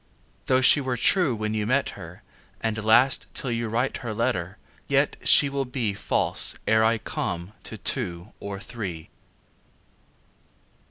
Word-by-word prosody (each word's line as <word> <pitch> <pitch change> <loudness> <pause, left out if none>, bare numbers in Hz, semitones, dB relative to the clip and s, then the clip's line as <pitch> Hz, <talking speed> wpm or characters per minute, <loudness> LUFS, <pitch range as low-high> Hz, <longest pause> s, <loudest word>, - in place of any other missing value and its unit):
Though 130 0 +3
she 140 +3 +6
were 130 -2 -2
true 150 0 +2
when 110 0 -3
you 105 -1 -1
met 135 +4 +1
her, 90 -3 -11 0.4
And 110 -1 -2
last, 120 +4 +4
till 130 - -1
you 115 0 -2
write 120 +4 -1
your 110 -3 -5
letter, 95 -4 -2 0.3
Yet - - +2
she 145 - +6
Will 140 0 -2
be 125 -5 -2
False, - - +1
ere 110 0 +4
I 115 +1 +3
come, 90 -2 -4
to - - -6
two 85 +4 -2
or 100 -1 -6
three. 95 -8 -7
110 Hz, 150 wpm, -25 LUFS, 100-125 Hz, 0.4 s, she